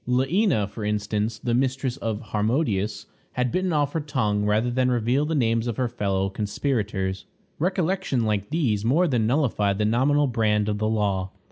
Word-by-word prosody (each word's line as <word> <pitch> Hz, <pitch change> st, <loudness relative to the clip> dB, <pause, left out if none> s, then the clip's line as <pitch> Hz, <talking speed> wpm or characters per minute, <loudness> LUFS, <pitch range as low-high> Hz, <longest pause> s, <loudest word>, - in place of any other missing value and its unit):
Leæna, 130 Hz, -, +2 dB
for 105 Hz, +2 st, -8 dB
instance, 105 Hz, +1 st, -1 dB
the 120 Hz, +2 st, -2 dB
mistress 130 Hz, 0 st, 0 dB
of 110 Hz, -3 st, -4 dB
Harmodius, 105 Hz, -3 st, 0 dB, 0.3 s
had 125 Hz, -1 st, 0 dB
bitten 185 Hz, 0 st, 0 dB
off 145 Hz, -3 st, +1 dB
her 165 Hz, -, 0 dB
tongue 115 Hz, -9 st, -1 dB
rather 110 Hz, +4 st, +1 dB
than 130 Hz, +1 st, +1 dB
reveal 125 Hz, +4 st, +1 dB
the 160 Hz, -, -1 dB
names 115 Hz, -3 st, +1 dB
of 115 Hz, -, -3 dB
her 130 Hz, -, +1 dB
fellow 100 Hz, -5 st, -1 dB
conspirators. 100 Hz, -2 st, -2 dB, 0.3 s
Recollections 180 Hz, -6 st, 0 dB
like 105 Hz, -2 st, -1 dB
these 125 Hz, -11 st, 0 dB
more 155 Hz, +10 st, +3 dB
than 120 Hz, -7 st, +1 dB
nullified 110 Hz, -7 st, +1 dB
the 105 Hz, -, +1 dB
nominal 135 Hz, +7 st, +3 dB
brand 110 Hz, -4 st, +1 dB
of 105 Hz, -1 st, -1 dB
the 110 Hz, 0 st, 0 dB
law. 100 Hz, -3 st, 0 dB
115 Hz, 170 wpm, -24 LUFS, 105-135 Hz, 0.3 s, more